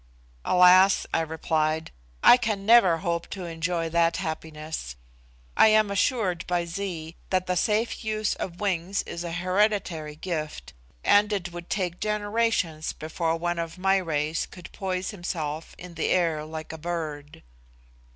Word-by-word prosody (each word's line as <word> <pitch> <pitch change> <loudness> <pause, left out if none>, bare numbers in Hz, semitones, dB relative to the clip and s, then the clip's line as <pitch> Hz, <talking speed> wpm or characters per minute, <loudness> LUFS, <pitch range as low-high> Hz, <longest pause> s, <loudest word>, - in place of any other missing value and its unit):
"Alas!" 185 +2 +6
I - - +3
replied, 160 0 -1 0.3
"I - - +10
can 215 -5 -2
never 210 -7 +6
hope 170 -1 -1
to 190 -3 -6
enjoy 165 0 -2
that 170 0 +2
happiness. 160 - -5 0.6
I - - +7
am 215 -1 +4
assured 200 -4 +1
by 175 -1 0
Zee 170 -3 -5
that 185 -1 +1
the 180 - -1
safe 215 +7 0
use 215 -1 0
of 175 -1 -6
wings 195 -1 -1
is 170 0 -6
a 170 - -4
hereditary 180 -4 0
gift, 155 - -5 0.3
and 205 +1 +4
it 185 -3 -2
would 175 0 -9
take 180 -3 -2
generations 210 -6 0
before 160 +1 -2
one 175 0 -2
of 165 +1 -4
my 190 +1 +3
race 155 -3 -1
could 180 -2 -12
poise 185 -1 -3
himself 165 -5 -5
in 180 -1 -10
the 165 - -1
air 165 -4 +1
like 155 0 -7
a 160 - -8
bird." 155 -3 -5
175 Hz, 150 wpm, -26 LUFS, 160-195 Hz, 0.6 s, I